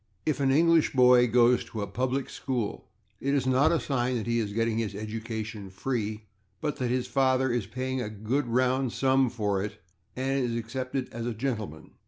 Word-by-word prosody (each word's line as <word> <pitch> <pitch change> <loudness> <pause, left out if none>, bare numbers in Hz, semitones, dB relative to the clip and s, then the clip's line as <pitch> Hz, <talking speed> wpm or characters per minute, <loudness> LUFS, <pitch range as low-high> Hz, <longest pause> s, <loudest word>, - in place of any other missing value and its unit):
If 155 -2 0
an 135 -1 +2
English 165 +3 +4
boy 125 -1 +6
goes 120 +1 +4
to 110 -2 -5
a - - -4
/public 130 +6 -1
school/, 125 -6 -3 0.3
it 140 +3 0
is 135 -3 +1
not 130 +2 +4
a 165 - +2
sign 130 -2 -1
that 115 - -2
he 115 0 +1
is 105 -3 -2
getting 115 +1 0
his 105 -4 -2
education 110 -1 -5
free, 110 +1 -3 0.4
but 150 -2 -2
that 125 -2 -1
his 125 0 0
father 130 -1 +2
is 120 -5 -1
paying 130 +3 -3
a 105 - -3
good 110 +7 -2
round 130 +1 +1
sum 130 -1 +3
for 105 -5 -1
it 105 0 -6 0.4
and 135 +1 0
is 120 -1 -1
accepted 130 +3 -3
as 115 +1 -4
a 120 - -3
gentleman. 110 - -4
125 Hz, 195 wpm, -28 LUFS, 110-130 Hz, 0.4 s, boy